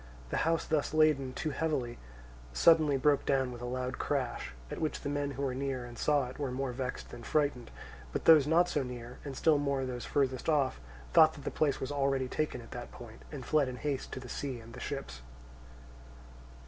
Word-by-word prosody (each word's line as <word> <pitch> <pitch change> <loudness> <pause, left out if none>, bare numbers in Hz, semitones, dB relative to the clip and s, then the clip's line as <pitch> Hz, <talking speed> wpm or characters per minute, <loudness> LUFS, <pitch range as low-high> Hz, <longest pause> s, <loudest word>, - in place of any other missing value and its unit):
The - - 0
house 165 0 +1
thus 155 0 0
laden 150 -4 +4
too 155 +4 -3
heavily 135 -5 -2 0.5
suddenly 155 - +5
broke 145 +1 +3
down 135 -2 +1
with 120 -1 -8
a - - -4
loud 125 +1 -3
crash; 130 - -2 0.2
at - - -5
which 155 - -1
the - - -3
men 145 0 -1
who 140 0 -4
were 135 -2 0
near 130 -1 -2
and 120 -1 -10
saw 145 +1 +2
it 130 - -10
were 140 -2 -1
more 130 +1 -2
vexed 125 0 -4
than 120 - -9
frightened; 140 -2 0 0.4
but - - -3
those 155 -4 +8
not 170 +3 +4
so 150 - 0
near, 125 -1 -7
and 140 -3 -6
still 155 -3 +4
more 140 -2 0
those 125 -1 -5
furthest 130 0 0
off, 140 - +2 0.3
thought 160 0 +7
that 145 - -10
the - - -3
place 150 -3 +1
was 130 - -3
already 135 -2 +1
taken 150 -2 -2
at 115 - -14
that 120 -1 -7
point, 115 -2 -11
and 140 -5 -7
fled 150 -3 +3
in 130 - -4
haste 135 +2 -3
to - - -4
the 125 - -9
sea 130 0 -4
and 115 +1 -12
the 125 - -8
ships. 135 - -5
135 Hz, 210 wpm, -32 LUFS, 125-145 Hz, 0.5 s, those